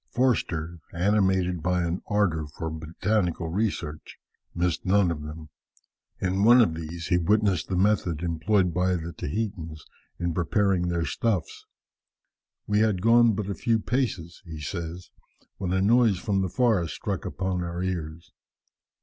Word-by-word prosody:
Forster, 85 -10 0
animated 95 -2 +1
by 90 +1 +1
an 85 +1 -2
ardour 90 -7 +1
for 80 +2 -5
botanical 85 +2 -1
research, 85 -5 -3 0.4
missed 85 -2 0
none 95 -2 +3
of 75 -3 -4
them. 75 +1 -8 0.7
In 95 +1 0
one 120 +3 +7
of 110 -9 +4
these 85 +1 -6
he 90 - +3
witnessed 100 0 +2
the 95 - -2
method 90 -4 +1
employed 90 +2 +1
by 90 +1 +1
the 85 0 -5
Tahitans 85 -3 -4 0.3
in 85 -1 -2
preparing 95 +1 +1
their 85 -1 0
stuffs. 100 -6 -2 1.0
"We 105 0 +1
had 105 -4 +1
gone 115 0 +6
but 100 -1 -3
a 100 - -2
few 115 +2 +1
paces," 110 -8 -2
he 80 -4 -8
says, 85 +2 -6 0.5
"when 95 -2 -3
a 95 +1 +2
noise 115 -2 +4
from 95 +1 0
the 95 - -1
forest 110 -7 +1
struck - - -3
upon 95 -1 -2
our 85 +1 -4
ears. 85 -3 -4
90 Hz, 150 wpm, -26 LUFS, 85-105 Hz, 1.0 s, one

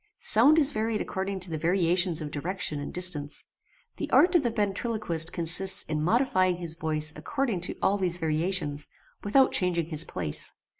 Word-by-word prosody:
Sound 275 +9 +4
is 295 -2 +3
varied 220 -3 -2
according 190 0 -4
to 180 -1 +4
the 160 - -3
variations 175 0 +1
of 150 - -7
direction 155 0 -3
and 145 - -6
distance. 170 -5 -1 0.5
The - - -4
art 355 +2 +4
of 345 - +4
the 240 - 0
ventriloquist 205 -5 -2
consists 185 +3 +3
in 155 -1 -3
modifying 185 - +1
his 170 -2 -7
voice 155 -2 0
according 210 - -3
to 180 - -3
all 200 +1 +2
these 180 -2 0
variations, 160 -2 -1 0.4
without 260 +6 +3
changing 175 -3 0
his 155 0 +1
place. 75 - -3
180 Hz, 165 wpm, -27 LUFS, 160-205 Hz, 0.5 s, Sound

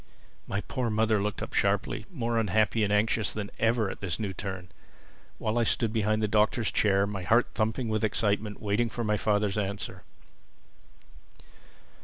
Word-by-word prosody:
My 100 - -2
poor 125 +1 -2
mother 110 -1 +2
looked 105 0 -2
up - - -7
sharply, 100 0 0
more 120 -7 -1
unhappy 110 +1 +2
and 105 - +1
anxious 105 +1 +2
than 105 -1 -5
ever 115 -1 +2
at - - -6
this 95 -2 -3
new 100 -3 -2
turn; 95 -1 -6 0.7
while 110 +2 0
I - - +3
stood 115 0 0
behind 110 -1 +1
the - - +3
Doctor's 110 +2 +2
chair, 100 -1 +3
my 100 -2 -4
heart 115 +7 +3
thumping 110 +2 -1
with 110 0 -1
excitement, 105 0 0
waiting 110 +3 0
for 120 - -4
my 105 -1 +1
father's 105 -1 +1
answer. 100 0 -4
105 Hz, 165 wpm, -28 LUFS, 100-110 Hz, 0.7 s, I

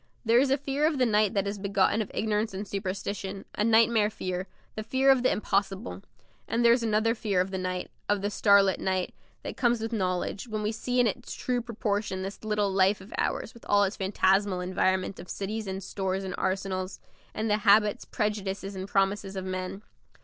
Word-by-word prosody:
There 230 +2 +5
is 270 +1 +3
a 275 - +3
fear 285 +2 0
of 310 -3 0
the 255 - +3
night 215 -2 +2
that 200 -1 +1
is 200 0 -3
begotten 200 +2 +2
of 210 - -4
ignorance 215 -1 -1
and 200 +2 -5
superstition, 195 0 -4
a - - 0
nightmare 225 -1 +4
fear, 185 -3 -4 0.3
the 215 - -4
fear 260 +5 +3
of 265 -2 +4
the 255 - +3
impossible; 200 0 -1 0.5
and 235 +1 +1
there 235 - +8
is 240 - +1
another 225 0 +2
fear 210 -5 -1
of 185 +1 0
the 190 - -2
night 185 0 -3 0.2
of 205 -1 +1
the 205 - 0
starlit 200 -2 +4
night 185 -1 -1 0.3
that - - -6
comes 240 -2 +2
with 225 +1 -4
knowledge, 185 +1 -1
when 215 -2 -3
we 210 - 0
see 250 +2 -1
in 245 - +5
its 235 +3 -3
true 250 -1 -1
proportion 205 -4 -2
this 195 +3 -7
little 210 -2 0
life 195 +2 +3
of 190 +4 -12
ours - - -1
with 235 - -16
all 205 0 +5
its 200 +1 -1
phantasmal 195 -1 +2
environment 185 +1 0
of 175 - -10
cities 215 +2 -4
and 190 0 -4
stores 190 0 -2
and 190 -1 -4
arsenals, 190 0 -2 0.4
and 220 - -1
the 210 -1 +3
habits, 210 0 +4
prejudices, 200 -3 -3
and 190 0 -5
promises 195 0 0
of 190 -1 -4
men. 185 +2 -4
205 Hz, 205 wpm, -28 LUFS, 190-220 Hz, 0.5 s, there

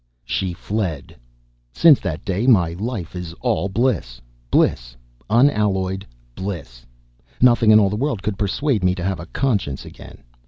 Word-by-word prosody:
She 95 -2 -2
fled. 90 -6 -4 0.6
Since 155 - +6
that 80 -5 -5
day 100 +4 -1
my 90 -10 +4
life 95 -2 -5
is 90 -2 -6
all 115 -5 0
bliss. 95 - -1 0.3
Bliss, - - +1 0.3
unalloyed 100 -7 +1 0.3
bliss. 70 -10 -7 0.5
Nothing 120 -2 +4
in 110 0 +8
all 100 -2 +2
the - - -1
world 120 -3 -2
could 105 - -2
persuade 105 +2 0
me 90 0 +2
to 90 - -5
have 95 0 -2
a 85 - -8
conscience 100 - -1
again. - - -13
95 Hz, 150 wpm, -21 LUFS, 85-115 Hz, 0.6 s, in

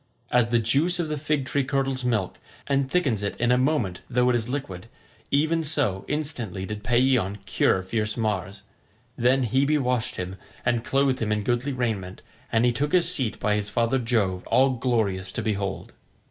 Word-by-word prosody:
As 120 -1 +3
the 120 - +3
juice 140 +11 +2
of 165 -3 -1
the 150 - -2
fig 145 -2 -1
tree 140 +2 +1
curdles 135 0 -1
milk, 110 -7 -1 0.3
and 140 -1 0
thickens 135 - +1
it 100 - -3
in 120 +1 +1
a - - +5
moment 130 - 0
though 125 0 +3
it - - +1
is 120 0 -1
liquid, 115 -8 -5 0.4
even 160 +3 +2
so 140 -11 0
instantly 130 - -2
did 105 +1 -6
Paeeon 120 -5 +2
cure 95 -1 +2
fierce 105 +3 -2
Mars. 100 -4 -2 0.5
Then 130 +2 +2
Hebe 135 +6 +2
washed 125 -2 -1
him, 90 +1 -5 0.3
and 120 -1 +1
clothed 135 0 +1
him 110 -1 0
in 105 -1 0
goodly 120 +5 0
raiment, 110 -8 -3 0.3
and 115 +1 +3
he 120 - +4
took 145 +5 -2
his 180 -1 +4
seat 130 -10 -1
by 105 - +1
his 105 0 -1
father 115 +3 +1
Jove 110 -7 0
all 135 +1 +4
glorious 110 -7 -1
to 120 - -3
behold. 100 -4 -3
120 Hz, 185 wpm, -25 LUFS, 105-135 Hz, 0.5 s, a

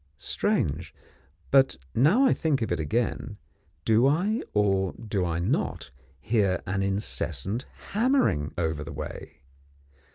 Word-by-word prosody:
Strange! 75 +3 -1 0.6
but 135 - +5 0.2
now 160 - +4
I - - +5
think 145 -7 0
of 110 - -3
it 85 - 0
again, 110 +5 -1 0.5
do 115 +4 +4
I, 190 - +1
or 95 -2 +2
do 105 -4 -3
I 85 -2 -1
not, 85 -7 -1 0.3
hear 100 - +1
an 95 +2 -1
incessant 100 +3 -2 0.2
hammering 210 - +2
over 80 -3 -1
the 75 - -8
way? - - -8
105 Hz, 125 wpm, -27 LUFS, 90-135 Hz, 0.6 s, but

